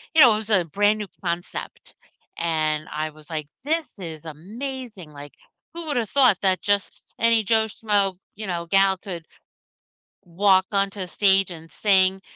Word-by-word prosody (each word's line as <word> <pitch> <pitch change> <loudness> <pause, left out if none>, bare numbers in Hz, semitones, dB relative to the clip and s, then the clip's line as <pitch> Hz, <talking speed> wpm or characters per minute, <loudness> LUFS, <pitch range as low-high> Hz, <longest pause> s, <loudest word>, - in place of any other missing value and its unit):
you 320 - +7
know, 250 -4 +9
it - - +1
was 215 0 -4
a 190 -5 +3
brand 205 +6 +2
new 210 - -4 0.2
concept, 170 0 -5 0.4
and 155 -2 0
I 155 +1 -2
was, 155 0 -17
like, 155 -3 -4 0.2
"This 315 -1 -2
is 165 -3 -7
amazing, 210 - -7
like, 145 0 -10 0.4
who 340 0 -6
would've 240 -8 -1
thought 250 -8 +4
that 190 -3 +2
just 205 -1 -2
any 230 -1 +4
Joe 220 +1 +2
Schmoe, 205 -3 0 0.2
you 215 0 -6
know, 170 -2 -3
gal 195 +1 +4
could 175 -4 -7 1.0
walk 190 +2 +3
onto 195 -1 -1
stage 195 0 +3
and 165 -1 -10
sing 190 -2 +3
195 Hz, 160 wpm, -23 LUFS, 170-215 Hz, 1.0 s, know